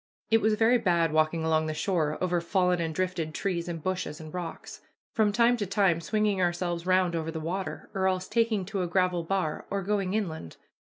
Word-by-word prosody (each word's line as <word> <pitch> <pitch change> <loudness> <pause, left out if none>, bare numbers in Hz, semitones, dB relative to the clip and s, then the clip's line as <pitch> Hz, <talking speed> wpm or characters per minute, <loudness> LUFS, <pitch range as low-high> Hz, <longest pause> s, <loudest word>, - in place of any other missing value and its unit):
It 225 0 +5
was 215 0 +3
very 230 +3 +4
bad 170 -6 +2
walking 155 +1 +2
along 160 0 +1
the 155 - -3
shore 155 -3 0
over 180 -1 +1
fallen 180 0 +1
and 165 -1 -1
drifted 180 -4 -2
trees 180 -3 -2
and 165 -3 -5
bushes, 180 -4 -3
and 155 -1 -10
rocks, 175 -2 -6 0.3
from 215 -2 +3
time 235 +3 +3
to 205 -3 -2
time 185 -4 +2
swinging 205 +3 0
ourselves 175 0 -1
round 185 -2 +3
over 160 -1 -2
the 160 0 -4
water, 180 +5 -4
or 190 -1 +1
else 185 -1 -1
taking 225 -3 +1
to 195 0 -3
a 180 - -1
gravel 180 0 +1
bar 175 -3 -2
or 200 0 -2
going 200 -1 0
inland. 160 - -4
180 Hz, 205 wpm, -28 LUFS, 165-200 Hz, 0.3 s, It